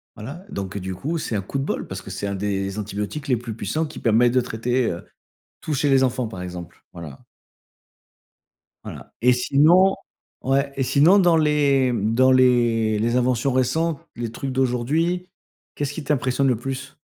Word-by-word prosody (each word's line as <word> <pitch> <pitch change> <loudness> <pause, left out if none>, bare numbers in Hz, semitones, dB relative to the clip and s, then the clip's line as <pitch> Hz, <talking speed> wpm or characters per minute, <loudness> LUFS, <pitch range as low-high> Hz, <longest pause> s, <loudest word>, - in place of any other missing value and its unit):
Voilà 140 - -9
donc, 95 -1 -5
heu, - - -3
du 95 0 -5
coup, 150 - -3
c'est 120 - -3
un 100 - 0
coup 100 +8 -5
de - - -1
bol - - -3
parce - - -6
que - - -11
c'est 100 - -4
un 100 - -3
des 100 0 -2
antibiotiques 105 +8 -5
les 125 -3 +2
plus 115 -1 -7
puissants 115 +10 -2
qui - - -10
permet 115 +1 +3
de 125 +1 +2
traiter, 120 +2 -1
heu, 85 - -7 0.6
tout 155 - -3
chez 145 +1 +1
les 135 -1 +4
enfants, 125 -1 0
par 95 -5 -8
exemple. 90 -2 -9
Voilà. 80 -6 -9 1.7
Voilà - - -10
et 125 +2 +5
sinon 155 +10 +4 0.5
ouais 135 +1 0
et 135 - 0
sinon 150 +9 +5
dans 175 -4 +4
les 145 -4 +2
dans 120 +4 +2
les 120 -4 +3
les 120 +2 0
inventions 125 +1 +1
récentes, 140 +5 0 0.2
les 120 -1 -3
trucs 135 +3 -5
d'aujourd'hui, 140 +8 0 0.5
qu'est 145 - -2
ce 140 - -5
qui 155 - -6
t'impressionne 135 -1 0
le 125 - +1
plus? 135 +2 -6
125 Hz, 185 wpm, -22 LUFS, 110-140 Hz, 1.7 s, et